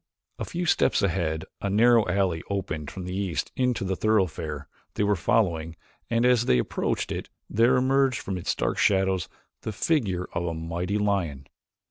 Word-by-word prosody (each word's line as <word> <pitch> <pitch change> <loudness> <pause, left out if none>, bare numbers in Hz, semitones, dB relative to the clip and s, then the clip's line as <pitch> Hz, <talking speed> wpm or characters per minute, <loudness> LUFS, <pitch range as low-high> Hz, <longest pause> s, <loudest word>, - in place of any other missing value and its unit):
A - - -2
few 175 +1 -3
steps 160 - +2
ahead 85 -4 0 0.2
a 100 - -1
narrow 115 +2 +5
alley 90 -3 +1
opened 90 -7 -3
from 95 -2 -7
the 90 +1 -4
east 95 -4 -2
into 125 -4 0
the 95 0 -1
thoroughfare 90 -9 0 0.3
they - - +1
were 105 0 +3
following 85 -6 +1 0.3
and 115 +1 +2
as 125 -2 +4
they 60 - +4
approached - - -1
it - - -4 0.2
there 115 +4 +3
emerged 130 0 +3
from 95 - -4
its 90 - -2
dark - - -1
shadows 95 -3 +2 0.3
the - - -4
figure 105 - 0
of 85 - -1
a 85 - -2
mighty 85 +5 -2
lion. 95 -10 -1
95 Hz, 170 wpm, -26 LUFS, 85-115 Hz, 0.3 s, narrow